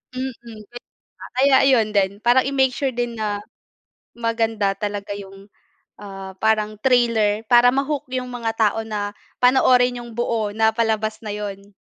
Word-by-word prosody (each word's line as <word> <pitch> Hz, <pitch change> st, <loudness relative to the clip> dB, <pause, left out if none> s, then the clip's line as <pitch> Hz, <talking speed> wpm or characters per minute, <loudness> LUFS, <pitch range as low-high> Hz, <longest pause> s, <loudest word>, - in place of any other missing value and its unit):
Mm, 260 Hz, +1 st, -3 dB
'yun 225 Hz, -3 st, -12 dB
nga. 240 Hz, -, -9 dB, 0.6 s
Kaya 270 Hz, +1 st, +5 dB
ayun 230 Hz, -5 st, +3 dB
din 195 Hz, -2 st, +2 dB
parang 245 Hz, +2 st, +5 dB
i-make 265 Hz, -1 st, +2 dB
sure 275 Hz, 0 st, -1 dB
din 240 Hz, -1 st, -2 dB
na 205 Hz, -1 st, -2 dB, 0.7 s
maganda 225 Hz, -3 st, 0 dB
talaga 205 Hz, -1 st, -4 dB
yung, 195 Hz, 0 st, -11 dB, 0.5 s
ah, 195 Hz, -2 st, -9 dB
parang 215 Hz, -1 st, +1 dB
trailer 230 Hz, -5 st, +2 dB
para 245 Hz, 0 st, +6 dB
ma-hook 280 Hz, +2 st, -1 dB
yung 255 Hz, -1 st, -2 dB
mga 230 Hz, -2 st, -2 dB
tao 220 Hz, 0 st, +2 dB
na 205 Hz, -1 st, -4 dB, 0.3 s
panoorin 250 Hz, -1 st, +4 dB
yung 235 Hz, -, -11 dB
buo 225 Hz, -3 st, -1 dB
na 220 Hz, 0 st, +3 dB
palabas 220 Hz, -1 st, 0 dB
na 210 Hz, -, -4 dB
yun. 200 Hz, -1 st, -7 dB
225 Hz, 150 wpm, -21 LUFS, 210-245 Hz, 0.7 s, para